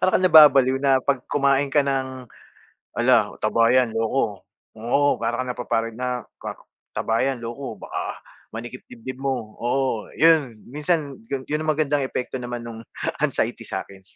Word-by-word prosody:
para 185 - +4
kang 185 - 0
nababaliw 140 -6 +7
na 135 -1 +4
'pag 135 -1 0
kumain 140 -1 +2
ka 145 - +4
ng, 130 -2 -2 0.7
"Hala, - - +3
taba 115 0 +3
'yan, 125 -3 +3
loko." 115 -2 -1 0.4
Oo 140 +6 +2
para - - -1
kang 130 - -5
napapari 115 -2 -1
na 125 0 -3 0.2
kak - - -6 0.4
"Taba 115 0 0
'yan, 135 -1 0
loko. 120 +3 -6
Baka - - -5 0.4
manikip 120 +3 -7
dibdib 125 +2 -8
mo." 125 -6 -2
Oo 125 -2 -1
'yon, 155 -7 +4
minsan 150 +1 -2
'yon 135 -1 -3
'yon 150 +1 -1
ang 155 - +1
magandang 145 -1 +1
epekto 130 0 -3
naman 120 -1 -5
no'ng 115 -1 -8 0.4
anxiety - - 0
sa'kin. 95 -1 -6
130 Hz, 155 wpm, -23 LUFS, 120-140 Hz, 0.7 s, nababaliw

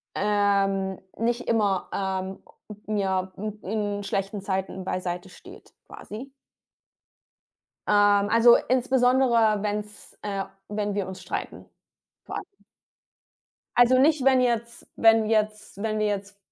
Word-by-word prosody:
ähm 195 -2 +1 0.2
nicht 240 +2 -1
immer, 205 -5 +1
ähm, 190 -1 -3 0.4
n 215 -1 -1
ja, 190 -1 -1
n 210 +1 -5
in 205 0 -2
schlechten 195 +1 -3
Zeiten 190 -1 -3
beiseite 180 0 -3
steht, - - -15
quasi. 255 +6 -9 1.6
Ähm, 205 -1 +4
also, 230 +2 +7
insbesondere 245 -4 +3
wenn 210 0 -1
es, 210 0 -13
äh 200 -2 -3 0.2
wenn 205 -1 -2
wir 200 -2 -1
uns 190 -1 -8
streiten, 180 - -5 0.6
vor - - -7
allem. - - -4 1.3
Also, 245 +1 +6
nicht, 290 -1 +3
wenn 265 -1 +5
jetzt 235 -1 -1
wenn 225 -1 +5
jetzt 215 -2 -1
wenn 215 -1 -1
wir 215 - +1
jetzt 200 0 -4
210 Hz, 125 wpm, -25 LUFS, 195-230 Hz, 1.6 s, also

